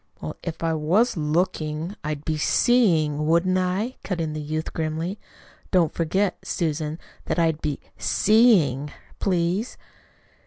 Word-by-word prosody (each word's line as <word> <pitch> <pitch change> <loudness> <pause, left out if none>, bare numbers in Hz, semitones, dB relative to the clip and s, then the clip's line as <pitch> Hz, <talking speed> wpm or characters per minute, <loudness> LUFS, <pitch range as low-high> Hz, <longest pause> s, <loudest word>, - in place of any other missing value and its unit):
"Well, 75 - -6
if 170 -1 -6
I 165 0 +1
was 175 +11 +2
LOOKING, 155 +1 -1
I'd 150 -1 -4
be 160 - 0
SEEING, 155 - +2
wouldn't 180 +3 +3
I?" 190 +7 -1
cut 185 -3 -3
in 160 -2 -2
the 155 - -4
youth 155 +2 -4
grimly. 160 +5 -3 0.5
"Don't 175 -5 +2
forget, 185 +4 0
Susan, 155 -2 -2 0.3
that - - -2
I'd 160 -2 +1
be 150 -2 -2 0.2
SEEING, 180 - +3 0.3
please." 185 +4 0
165 Hz, 130 wpm, -24 LUFS, 155-185 Hz, 0.5 s, wouldn't